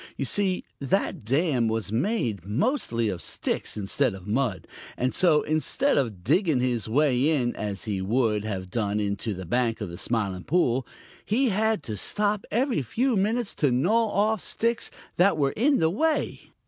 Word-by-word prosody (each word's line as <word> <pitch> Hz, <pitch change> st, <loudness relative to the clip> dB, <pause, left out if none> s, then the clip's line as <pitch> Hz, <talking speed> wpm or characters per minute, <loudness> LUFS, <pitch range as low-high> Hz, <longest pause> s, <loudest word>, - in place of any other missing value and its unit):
You -, -, -1 dB
see, 195 Hz, -3 st, +2 dB, 0.2 s
that 175 Hz, -, -1 dB
dam 135 Hz, -, +1 dB
was 110 Hz, -2 st, -2 dB
made 115 Hz, -, -1 dB
mostly 115 Hz, -, 0 dB
of 90 Hz, -3 st, -4 dB
sticks -, -, -3 dB
instead 105 Hz, +3 st, 0 dB
of 95 Hz, -1 st, -11 dB
mud, 105 Hz, -, -1 dB, 0.3 s
and 130 Hz, +1 st, 0 dB
so, 165 Hz, -5 st, +4 dB
instead 155 Hz, -, +1 dB
of 115 Hz, -10 st, -1 dB
digging 155 Hz, -, +2 dB
his 120 Hz, -3 st, -1 dB
way 135 Hz, +2 st, +3 dB
in 125 Hz, -6 st, 0 dB
as 100 Hz, -2 st, -4 dB
he 100 Hz, -4 st, -2 dB
would 105 Hz, +1 st, +1 dB
have 95 Hz, -4 st, -5 dB
done 105 Hz, -3 st, -1 dB
into 100 Hz, +1 st, -2 dB
the 95 Hz, 0 st, -7 dB
bank 120 Hz, +4 st, 0 dB
of 105 Hz, -4 st, -4 dB
the 85 Hz, -, -7 dB
Smiling 100 Hz, -6 st, -2 dB
Pool, 130 Hz, -7 st, +1 dB, 0.4 s
he 250 Hz, +5 st, +1 dB
had 220 Hz, -2 st, +1 dB
to 110 Hz, -, -5 dB
stop 205 Hz, -, 0 dB
every 245 Hz, -, +1 dB
few 235 Hz, -, 0 dB
minutes 215 Hz, +3 st, 0 dB
to 145 Hz, -, +1 dB
gnaw 195 Hz, -, +2 dB
off 210 Hz, 0 st, +1 dB
sticks 230 Hz, 0 st, -1 dB, 0.3 s
that 180 Hz, -1 st, +4 dB
were 140 Hz, -2 st, +2 dB
in 275 Hz, +6 st, +2 dB
the 160 Hz, -1 st, +2 dB
way. 315 Hz, -, -1 dB
130 Hz, 175 wpm, -26 LUFS, -, 0.4 s, so